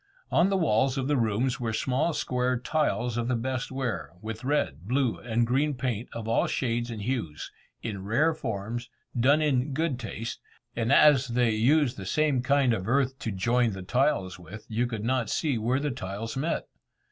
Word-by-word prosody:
On 175 +3 +4
the 195 - +2
walls 135 - +2
of 130 -1 -1
the 145 - +2
rooms 120 +1 +1
were 115 -2 -2
small 130 +8 +1
square 125 -3 0
tiles 125 -3 0
of 120 0 -1
the 125 - +1
best 130 +2 -2
ware, 115 - -3
with 110 +4 -6
red, 125 - -1
blue, 130 -1 +1
and 120 0 0
green 140 +5 +1
paint 125 -3 -3
of 115 -1 -6
all 115 - +2
shades 120 -2 -1
and 110 -3 -5
hues, 105 - -3 0.3
in 100 -4 -4
rare 140 +11 +2
forms, 115 -2 -4 0.3
done 140 +6 +4
in 140 -1 +1
good 155 -3 -1
taste; 115 0 -5 0.4
and 115 +1 0
as 140 -2 +6
they 120 -1 +2
use 125 +5 +3
the 95 -2 -8
same 150 -2 +2
kind 135 -2 +3
of 95 -3 -3
earth 135 0 +1
to 115 - -3
join 115 +4 +1
the 95 -1 -6
tiles 95 -4 0
with, 105 +5 -10
you 115 +2 0
could 115 -3 -4
not 125 -2 0
see 140 -8 0
where 120 +5 +1
the 145 0 -1
tiles 105 +2 -5
met. 150 +5 -1
120 Hz, 190 wpm, -27 LUFS, 110-135 Hz, 0.4 s, as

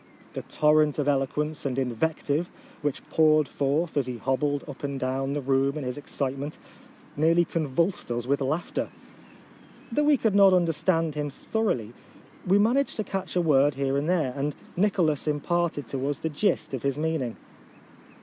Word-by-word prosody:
The - - -4
torrent 150 -1 +2
of 145 -1 0
eloquence 145 +2 0
and 135 -2 -2
invective 145 +5 -1 0.3
which 145 -2 -3
poured 155 -2 +4
forth 150 +4 -1
as 140 -3 +1
he 125 -1 -4
hobbled 140 +3 0
up 145 -1 -9
and 140 -1 -3
down 135 +2 -1
the 145 - -2
room 135 +2 +1
in 150 - -4
his 125 -1 -3
excitement, 140 0 -4 0.6
nearly 165 +3 +3
con 165 -3 -2
vulsed 170 +6 0
us 120 0 -2
with 140 +2 0
laughter. 155 +6 -2 1.0
Though 295 +6 +1
we 295 -1 +5
could 220 -4 +1
not 195 -1 +7
understand 165 -2 +1
him 150 0 -2
thoroughly, 135 - -2 0.5
we 190 +2 +5
managed 245 +7 +2
to 215 - -2
catch 190 -3 -4
a 180 - +3
word 145 -3 +3
here 135 0 0
and 145 +4 0
there, 160 -8 +1
and 145 +1 -2 0.2
Nicholas 175 -7 +1
imparted 150 -1 0
to 135 +1 -2
us 145 - -2
the 160 - -3
gist 160 0 0
of 130 - -3
his 140 0 -1
mean 160 0 0
ing. 120 -3 -4
150 Hz, 175 wpm, -26 LUFS, 135-170 Hz, 1.0 s, not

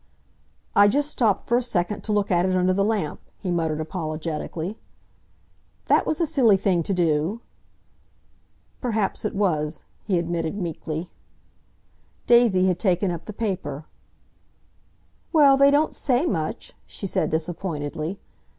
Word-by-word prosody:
"I 205 0 +7
just 290 +7 +1
stopped 220 -8 +1
for 235 - +3
a - - +1
second 205 -3 -1
to 215 - -2
look 205 -1 +1
at 175 -1 +3
it 185 - +1
under 185 0 +2
the 195 +1 +1
lamp," 205 -8 -1 0.2
he 185 - -4
muttered 160 -3 -1
apologetically. 160 +2 -4 1.1
"That - - +4
was 315 - 0
a 335 - +3
silly 255 -10 +4
thing 185 -3 +1
to 165 - -3
do!" 170 +5 0 1.4
"Perhaps 220 -5 -1
it 210 - -2
was," 160 -6 -1 0.2
he 195 -4 0
admitted 170 +1 -2
meekly. 165 -2 -4 1.1
Daisy 235 -6 +5
had 180 -2 +1
taken 185 -1 +1
up 170 -2 -6
the - - -6
paper. 180 -9 -4 1.5
"Well, 290 -4 +6
they 275 +1 +6
don't 290 +2 +2
say 260 +3 +1
much," 160 - -3
she - - -6
said 190 - 0
disappointedly. 160 0 -3
185 Hz, 140 wpm, -24 LUFS, 165-220 Hz, 1.5 s, I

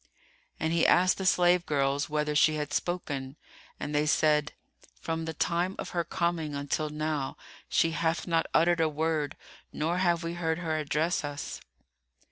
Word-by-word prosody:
And 160 +1 0
he 170 - +3
asked 185 +2 +4
the 190 - 0
slave 180 -1 +4
girls 140 -1 0
whether 150 0 0
she 155 +1 +4
had 150 -1 -3
spoken, 145 -7 -2 0.4
and 150 - -4
they 150 +1 +2
said, 150 -1 +2 0.5
"From 165 0 -3
the 160 - -4
time 175 +4 0
of - - -5
her 170 -1 0
coming 165 -4 -1
until 145 +2 -2
now 150 -2 -2 0.3
she 165 - +3
hath 165 0 0
not 165 -2 +1
uttered 170 +1 +3
a 160 - +3
word 155 -1 -1 0.3
nor 165 +4 -1
have 175 -2 +2
we 165 0 -3
heard 160 -2 -1
her 165 -3 -2
address 155 +3 0
us." 145 -1 -5
160 Hz, 165 wpm, -29 LUFS, 150-170 Hz, 0.5 s, asked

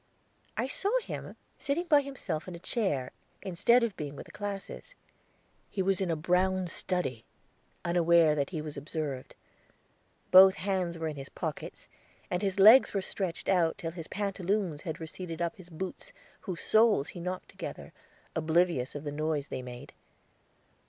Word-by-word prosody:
I - - +1
saw 385 +9 0
him, - - -6 0.2
sitting 310 +6 -1
by 300 -4 +5
himself 200 - -5
in 180 - -6
a - - -9
chair, 170 - -1 0.3
instead 235 +7 +3
of 230 -4 -1
being 145 -2 -5
with - - -8
the - - -14
classes. 205 - -6 0.7
He 190 - -1
was 195 0 +1
in 190 - 0
a 165 - +1
brown 185 +4 +1
study, 175 - -2 0.6
unaware 170 -2 +4
that 140 -2 -1
he 160 -4 -4
was 150 -1 -7
observed; 145 -2 -4 1.0
both 190 +1 +9
hands 185 -3 -1
were 160 -1 -2
in 150 -2 -5
his 135 0 -7
pockets, - - -6 0.4
and 180 +1 0
his 200 0 -1
legs 220 +4 +8
were 195 - +2
stretched 190 -3 -4
out 175 -4 +3
till 165 - -4
his 165 -1 -8
pantaloons 195 -4 -1
had 160 -3 -5
receded 165 +1 -6
up 170 -1 -2
his 180 -2 -13
boots, 180 +3 -6 0.3
whose 185 -4 -5
soles 215 -10 +4
he 175 - -8
knocked 180 +1 -4
together, - - -8 0.4
oblivious 160 -4 +1
of 145 - -5
the 145 - -4
noise 150 -1 -1
they - - -4
made. 125 -1 -9
175 Hz, 165 wpm, -30 LUFS, 155-195 Hz, 1.0 s, both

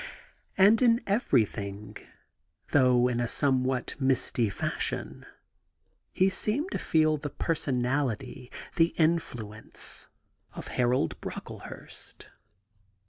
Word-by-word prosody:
And 205 +4 +6
in 235 -2 +5
ever3i;hing, 110 - -1 0.7
though 125 -3 +4
in 120 -1 -1
a 120 - 0
somewhat 130 -1 +1
misty 130 -4 +1
fashion, 100 - -2 0.8
he 190 - +3
seemed 220 - -1
to - - -2
feel 155 -1 +2
the 145 0 -5
personality, 130 -4 -2 0.3
the 165 0 +3
influence, 125 -10 -2 0.5
of - - -8
Harold 120 -8 0
Brocklehurst. - - -9
130 Hz, 90 wpm, -28 LUFS, 120-165 Hz, 0.8 s, And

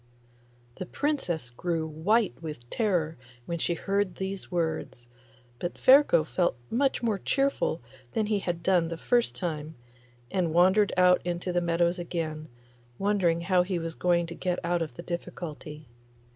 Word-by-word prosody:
The 185 - -5
Princess 175 - -2
grew 165 +5 -2
white 185 - +1
with 150 -7 -7
terror 175 -8 0 0.3
when 170 +3 -3
she 170 - 0
heard 195 0 -1
these 190 0 -5
words; 160 -8 -2 0.5
but 175 - -3
Ferko 260 - +6
felt 175 -5 0
much 265 +1 +1
more 215 -4 +1
cheerful 275 - 0 0.3
than 220 - +1
he 210 -1 +1
had 175 -3 -3
done 180 -3 +3
the 165 0 -5
first 240 +7 +1
time, 160 -3 -4 0.6
and 170 -4 0
wandered 190 +4 +5
out 180 0 +5
into 175 +1 -2
the 175 - +2
meadows 170 +1 +1
again, 160 -3 -4 0.5
wondering 190 -5 +1
how 180 +1 +3
he 180 0 -1
was 165 -1 -4
to 175 -1 +2
get 180 +1 -2
out 175 0 +1
of 160 - -4
the 170 - -8
difficulty. 165 -3 -6
175 Hz, 150 wpm, -28 LUFS, 165-195 Hz, 0.6 s, Ferko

